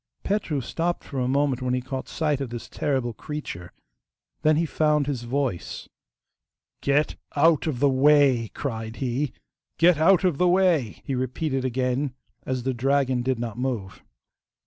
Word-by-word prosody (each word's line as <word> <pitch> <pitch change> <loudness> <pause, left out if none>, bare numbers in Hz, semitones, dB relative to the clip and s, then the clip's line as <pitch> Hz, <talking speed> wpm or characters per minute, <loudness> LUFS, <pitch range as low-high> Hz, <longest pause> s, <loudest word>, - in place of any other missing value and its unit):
Petru 195 -8 -1
stopped 170 +7 -2
for 140 - -5
a 125 - 0
moment 135 -1 +1
when 125 0 0
he - - 0
caught 130 +1 -5
sight 150 -3 0
of 135 - -3
this 120 0 -7
terrible 130 -5 -1
creature. 105 - -7 0.7
Then 155 0 +4
he 165 +2 +2
found 150 -2 +2
his 135 -4 -2
voice. 125 -7 -3 0.9
'Get 145 +2 +1 0.2
out 160 +1 +4
of 140 -6 -2
the 140 - +4
way!' 135 -3 +4
cried 110 -4 -4
he. 130 +2 -1 0.5
'Get 170 -2 +5
out 185 +3 +5
of 180 -6 +1
the 180 - +4
way!' 175 - +2
he 135 - -2
repeated 130 +2 -1
again, 130 +1 -1 0.3
as 130 -1 -2
the 130 +1 0
dragon 130 0 +1
did 130 0 0
not 115 0 -5
move. 120 -7 -3
135 Hz, 160 wpm, -25 LUFS, 125-150 Hz, 0.9 s, Get